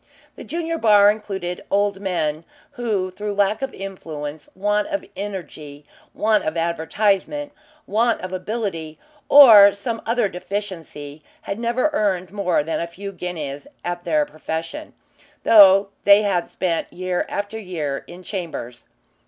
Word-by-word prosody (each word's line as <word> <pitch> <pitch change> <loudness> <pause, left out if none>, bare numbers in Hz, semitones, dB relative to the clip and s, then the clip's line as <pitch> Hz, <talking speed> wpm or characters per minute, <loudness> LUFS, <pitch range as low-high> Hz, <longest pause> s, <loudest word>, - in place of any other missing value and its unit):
The - - -10
junior 330 0 -3
bar 205 -3 +6
included 190 -4 -5
old 200 -1 +1
men, 170 -5 -2 0.3
who, 215 -8 -2
through 205 +2 -5
lack 205 +3 +1
of 270 -1 -3
influence, 155 -6 -7
want 210 +2 0
of 300 -1 -3
energy, 155 -7 -7 0.3
want 215 -1 +2
of 155 +2 -3
advertisement, 195 - 0 0.3
want 230 +3 +1
of 185 +1 -6
ability, 185 -6 -4 0.3
or 220 -8 +9
some 225 +2 -4
other 230 -1 +1
deficiency, 175 -6 -6 0.2
had 200 - -5
never 240 +6 0
earned 190 -7 0
more 200 -6 0
than 160 +2 -2
a 170 - -3
few 195 +4 -8
guineas 160 -7 -6 0.2
at 175 0 -3
their 155 -3 +1
profession, 160 - -6 0.5
though 195 -2 +7
they 205 +1 +6
had 185 -4 0
spent 170 -3 -2
year 185 0 -2
after 205 +2 -4
year 160 -9 -4
in 180 +1 -11
chambers. 165 - -6
195 Hz, 135 wpm, -21 LUFS, 170-210 Hz, 0.5 s, or